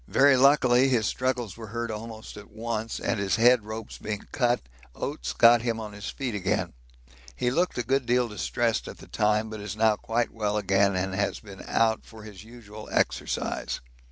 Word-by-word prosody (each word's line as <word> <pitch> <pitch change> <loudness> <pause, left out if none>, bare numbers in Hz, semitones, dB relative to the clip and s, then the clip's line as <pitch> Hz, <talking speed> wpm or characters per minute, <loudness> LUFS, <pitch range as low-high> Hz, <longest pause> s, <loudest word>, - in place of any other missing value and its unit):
Very 140 0 +5
luckily 130 -1 +5
his 120 -4 +2
struggles 125 -6 -1
were 115 -1 -9
heard 115 +1 -4
almost 110 0 -8
at 105 0 -11
once, 110 +1 -4
and 115 - -1
his 95 -2 +1
head 120 +1 +5
ropes 110 0 -7
being 105 -1 -4
cut, 120 -2 +1 0.3
Oates 145 - -4
got 120 0 +6
him 115 -1 -1
on 105 -2 -7
his 105 0 -6
feet 130 -4 -4
again. 95 -2 -1 0.6
He 120 - 0
looked 175 +7 0
a 120 - 0
good 130 +1 0
deal 125 0 +3
distressed 115 +2 -1
at - - -8
the - - -13
time, 105 +1 +1
but 110 -1 -6
is 105 -1 -5
now 110 -1 +3
quite 115 +1 -1
well 105 -1 -1
again 100 -1 +2
and 95 +1 -1
has 100 +1 -1
been 100 -3 -11
out 110 -1 +2
for 110 -1 -13
his 105 -3 -11
usual 110 -2 -11
exercise. - - -1
110 Hz, 190 wpm, -27 LUFS, 105-120 Hz, 0.6 s, got